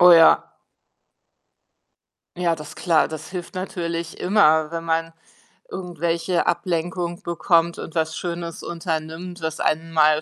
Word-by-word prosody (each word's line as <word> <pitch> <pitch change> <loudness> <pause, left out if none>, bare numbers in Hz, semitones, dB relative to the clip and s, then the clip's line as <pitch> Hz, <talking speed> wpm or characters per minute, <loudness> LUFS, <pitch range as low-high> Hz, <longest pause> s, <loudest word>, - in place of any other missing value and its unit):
Oh, 180 0 +9
ja. 165 -1 +6 1.8
Ja, 175 -2 +2
das 150 -2 -8
klar, 165 -3 +3
das 155 0 -7
hilft 180 0 -6
natürlich 170 -2 -4
immer, 160 -6 +4
wenn 165 0 -4
man 165 0 -1 0.6
irgendwelche 170 0 -1
Ablenkung 175 0 -1
bekommt 170 0 +2
und 160 - -7
was 160 -1 0
Schönes 170 -1 -4
unternimmt, 165 +1 -4
was 160 -1 -3
einen 165 +1 0
mal 155 -1 +5
170 Hz, 125 wpm, -23 LUFS, 160-175 Hz, 1.8 s, Oh